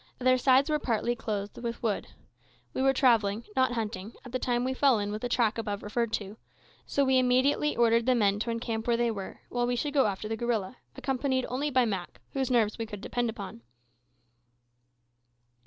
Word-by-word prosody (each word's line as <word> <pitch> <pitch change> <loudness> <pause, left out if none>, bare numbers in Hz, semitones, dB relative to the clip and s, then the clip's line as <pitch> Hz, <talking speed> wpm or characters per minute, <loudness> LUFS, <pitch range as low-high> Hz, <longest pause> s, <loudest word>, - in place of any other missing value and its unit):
Their 255 0 +3
sides 265 +2 +4
were 305 -1 +1
partly 240 -2 0
clothed 205 -3 -4
with 235 0 -5
wood. 215 -3 -1 0.7
We - - -1
were 270 0 +5
travelling 230 -5 +3
not 260 -1 +3
hunting 220 -2 -4
at 245 - -9
the 255 - -1
time 245 -1 0
we 260 +1 0
fell 265 -2 +4
in 205 0 -2
with 215 +1 -4
the 245 - -2
track 230 -2 +1
above 205 -2 -3
referred 230 +2 -1
to, 205 -1 -3 0.5
so 280 - +2
we 260 -1 +4
immediately 255 +4 +2
ordered 230 0 +3
the 255 - +4
men 205 -3 +2
to 230 - -2
encamp 230 -1 -3
where 235 -1 +3
they 235 -1 +1
were, 195 -3 -7
while 240 0 0
we 245 - 0
should 285 +4 -2
go 275 -6 +4
after 200 +1 -3
the 225 - -2
gorilla, 230 -1 -2 0.2
accompanied 260 -1 -1
only 275 +4 -1
by 255 -3 +3
Mak, 190 -5 -4
whose 265 -2 -1
nerves 230 -4 +2
we 225 - -3
could 205 -2 -8
depend 240 +1 -1
on. 195 - -7
235 Hz, 200 wpm, -29 LUFS, 215-255 Hz, 0.7 s, were